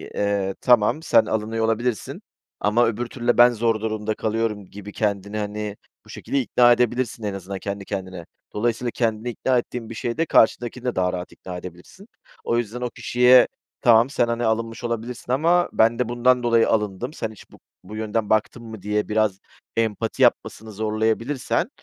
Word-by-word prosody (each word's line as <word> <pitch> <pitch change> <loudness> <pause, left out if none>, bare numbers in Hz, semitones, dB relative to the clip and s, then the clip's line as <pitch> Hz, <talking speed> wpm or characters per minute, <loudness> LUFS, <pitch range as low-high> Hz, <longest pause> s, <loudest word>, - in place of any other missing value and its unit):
eee, 100 -1 -1
"Tamam, 125 +5 +3
sen 115 - +4
alınıyor 110 +1 -1
olabilirsin 115 -1 -2 0.4
ama 110 +4 +3
öbür 115 +2 -2
türlü 120 0 -7
de 120 - +3
ben 120 +1 +8
zor 115 -1 0
durumda 110 -1 -2
kalıyorum." 110 -2 -2
gibi 105 +2 -10
kendini, 100 0 -2
hani, 105 0 -4 0.3
bu - - -19
şekilde 140 - -3
ikna 120 0 +4
edebilirsin 120 -1 0
en 105 -1 -2
azından 95 0 -6
kendi 100 0 -5
kendine. 95 -4 -6 0.3
Dolayısıyla 120 +2 -1
kendini 115 0 -1
ikna 125 +2 0
ettiğin 120 -1 -4
bir 115 - -7
şeyde 120 +9 -2
karşıdakini 120 -2 +2
de 125 - -1
daha 90 0 +1
rahat 90 0 -5
ikna 90 -1 -8
edebilirsin. 90 - -12 0.4
O 115 - 0
yüzden 120 +1 -3
o 125 - -2
kişiye 125 +1 +5 0.3
"Tamam, 120 -1 +5
sen, 120 -4 +1
hani, 115 0 -1
alınmış 115 +1 -2
olabilirsin 120 +1 -4
ama 170 +6 +3
ben 115 +2 +3
de 125 - 0
bundan 125 +1 +2
dolayı 115 -1 +3
alındım. 105 +5 -1
Sen 110 -8 -4
hiç 110 - -16
bu - - -17 0.2
bu 105 - -10
yönden 110 0 -2
baktın 110 +2 0
mı?" 110 -3 -9
diye 105 +2 -1
biraz 105 -3 +1 0.4
empati 115 0 0
yapmasını 110 +1 +1
zorlayabilirsen, 110 +5 -1
115 Hz, 175 wpm, -23 LUFS, 105-120 Hz, 0.4 s, ben